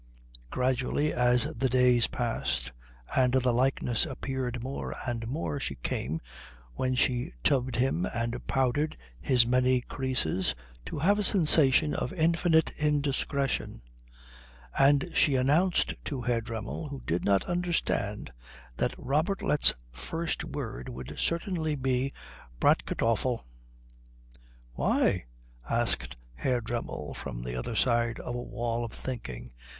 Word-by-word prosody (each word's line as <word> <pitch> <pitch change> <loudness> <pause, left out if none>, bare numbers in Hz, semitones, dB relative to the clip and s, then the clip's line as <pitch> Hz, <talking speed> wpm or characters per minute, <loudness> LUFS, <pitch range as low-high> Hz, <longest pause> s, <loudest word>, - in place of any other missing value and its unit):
Gradually 130 - 0
as 125 0 +3
the 130 +3 0
days 125 -1 +4
passed 120 - -2 0.4
and 130 -1 +3
the 130 -1 +3
likeness 125 -1 +1
appeared 130 -3 -4
more 135 +2 -4
and 115 -2 -3
more 140 +2 -3
she 70 - -3
came, 70 +5 -3 0.5
when 130 - -1
she 125 - +1
tubbed 130 -2 +2
him 110 -8 +1
and 115 +1 -3
powdered 135 +3 +1 0.2
his 125 - +3
many 125 +1 +3
creases, 125 - -1 0.3
to - - -5
have 200 +8 +3
a - - +1
sensation 155 -6 +5
of - - -2
infinite 165 -1 +3
indiscretion; 140 - 0 0.9
and 140 +4 +4
she 140 - +4
announced 155 +8 +2
to 140 -5 -3
Herr 120 -1 +1
Dremmel, 115 +6 -5
who 140 -1 -7
did 85 +2 -1
not 100 -1 +3
understand, 170 - -1 0.5
that - - -1
Robertlet's 150 +2 +2 0.2
first 165 - -3
word 60 +1 -5
would 65 +1 -7
certainly 170 -3 0
be 130 0 0 0.5
Bratkartoffel. 115 +2 +1 1.3
"Why?" - - +1 0.4
asked - - +2 0.2
Herr 120 - 0
Dremmel, 115 -10 -4
from - - -6
the 60 0 -4
other 60 - -3
side 120 0 +2
of 120 - -5
a 120 - -3
wall 120 0 -3
of 115 - -5
thinking. 65 - -6
125 Hz, 125 wpm, -29 LUFS, 115-145 Hz, 1.3 s, sensation